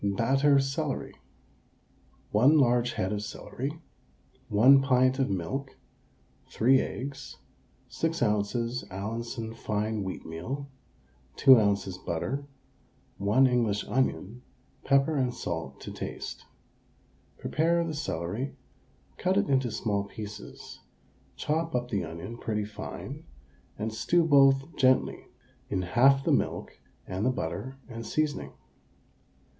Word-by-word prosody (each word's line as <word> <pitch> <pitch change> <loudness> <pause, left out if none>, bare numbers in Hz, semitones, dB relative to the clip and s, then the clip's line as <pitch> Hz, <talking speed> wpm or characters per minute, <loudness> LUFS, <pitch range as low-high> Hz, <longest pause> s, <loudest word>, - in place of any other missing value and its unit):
BATTER 135 +8 +3
CELERY. 135 0 -1 1.2
1 130 +9 +5
large 120 -3 +3
head 95 +3 -1
of 105 - -2
celery, 135 +7 -5 0.7
1 130 +7 +7
pint 130 0 +3
of 135 - +1
milk, 130 +10 -3 0.7
3 130 +4 +4
eggs, 140 +2 -6 0.5
6 165 -4 -1
oz. 115 +3 0
Allinson 115 +4 -4
fine 110 -1 -2
wheatmeal, 95 +9 -5 0.7
2 130 -3 +8
oz. 100 -3 0
butter, 135 +12 -3 0.7
1 105 +7 +4
English 115 -5 +1
onion, 125 -3 -1 0.4
pepper 140 +3 +3
and 125 -3 0
salt 80 -5 -5
to - - -7
taste. - - -6 0.9
Prepare 170 +2 +1
the 160 - -3
celery, 125 - -3 0.6
cut 185 +1 +1
it 205 -1 +2
into 130 -2 +2
small 100 -3 -1
pieces, 105 0 -9 0.6
chop 160 +1 -1
up 125 0 -2
the 100 - 0
onion 90 +9 -7
pretty 105 -2 -2
fine, 105 0 -7 0.5
and 110 +1 -3
stew 170 +9 +2
both 135 0 +4
gently 130 -1 +2 0.4
in 95 -2 -1
half 135 +9 +4
the - - +1
milk - - 0 0.3
and 95 +2 -3
the 125 - +3
butter 115 +4 -4
and 115 -2 -7
seasoning. 155 +5 -2
120 Hz, 115 wpm, -28 LUFS, 105-135 Hz, 1.2 s, 2